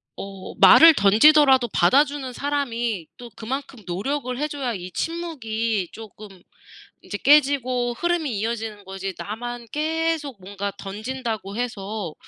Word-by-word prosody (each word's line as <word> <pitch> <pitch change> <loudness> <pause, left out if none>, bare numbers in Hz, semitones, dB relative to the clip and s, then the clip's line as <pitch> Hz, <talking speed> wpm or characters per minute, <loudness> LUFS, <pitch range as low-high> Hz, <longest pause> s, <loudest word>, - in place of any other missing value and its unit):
어 195 -1 -8
말을 320 - +8
던지더라도 265 +5 +5
받아주는 280 -1 +2
사람이 240 - -2
또 240 -1 -10
그만큼 265 +2 -6
노력을 250 +7 -3
해 300 - 0
줘야 275 -5 -3
이 185 -3 -7
침묵이 230 - -3
쪼끔 215 -1 -11 0.7
인제 205 - -6
깨지고 260 -4 +3
흐름이 335 -10 -1
이어지는 220 -1 -4
거지 195 0 -6
나만 240 +3 -6
계속 315 -4 -2
뭔가 200 +1 -5
던진다고 215 -1 -5
해서 210 -7 -4
240 Hz, 280 characters per minute, -23 LUFS, 205-285 Hz, 0.7 s, 말을